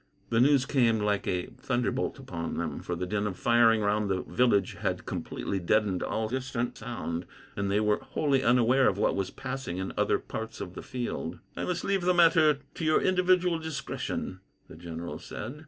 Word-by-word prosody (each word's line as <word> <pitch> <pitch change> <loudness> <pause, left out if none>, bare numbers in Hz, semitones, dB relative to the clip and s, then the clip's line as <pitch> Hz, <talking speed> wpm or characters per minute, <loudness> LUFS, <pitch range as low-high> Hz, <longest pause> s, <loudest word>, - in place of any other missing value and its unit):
The 115 - +3
news 135 0 +5
came 120 -6 +3
like 105 -1 0
a 90 -1 0
thunderbolt 130 -3 -1
upon 85 -1 -5
them, 80 -4 -3
for 90 - -3
the 90 +2 -3
din 105 +2 -1
of 95 -3 -5
firing 115 -2 +4
round 105 0 +1
the 95 -1 0
village 105 -7 +2
had - - -2
completely 95 +11 -3
deadened 100 +1 +1
all 110 0 -1
distant 125 0 -2
sound, 100 -7 -5 0.3
and 100 -1 -1
they 100 +1 +2
were 105 -1 +2
wholly 140 -3 0
unaware 125 +1 +4
of 100 - -3
what - - +2
was 95 -1 -1
passing 135 -9 -5
in 95 0 -3
other - - +3
parts 110 0 -6
of 90 - -6
the - - -7
field. 125 -2 -4 0.2
"I - - -3
must 175 -2 -2
leave 195 -1 +1
the 180 +1 +2
matter 165 -4 +5 0.2
to - - -6
your 155 0 +4
individual 180 -2 +3
discretion," 140 -10 -4 0.3
the - - -12
general 85 -1 -6
said. 120 +9 -7
115 Hz, 190 wpm, -29 LUFS, 95-135 Hz, 0.3 s, news